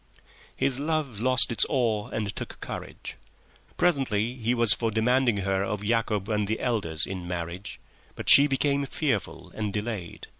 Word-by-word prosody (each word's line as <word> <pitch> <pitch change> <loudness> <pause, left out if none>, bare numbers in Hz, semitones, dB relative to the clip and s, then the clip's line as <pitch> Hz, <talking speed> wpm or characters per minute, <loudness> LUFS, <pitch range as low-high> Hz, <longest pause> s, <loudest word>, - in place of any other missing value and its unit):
His 135 -1 0
love 145 -7 -2
lost 130 -1 +4
its 115 - +4
awe 115 -7 0
and 105 -3 -4
took - - -7
courage. - - -7 0.6
Presently 130 -10 +1
he 120 -1 -1
was 115 -3 +7
for 115 - -1
demanding 120 +1 +2
her 95 0 0
of 100 +1 -3
Yacob 105 -2 0
and 105 -2 -1
the 110 +1 -2
elders 85 -10 0
in 90 -2 -6
marriage, 90 +2 -6 0.4
but - - -8
she 140 +1 +8
became 140 0 0
fearful 135 - -3
and 105 -2 -3
delayed. 105 -4 -5
110 Hz, 155 wpm, -26 LUFS, 100-130 Hz, 0.6 s, she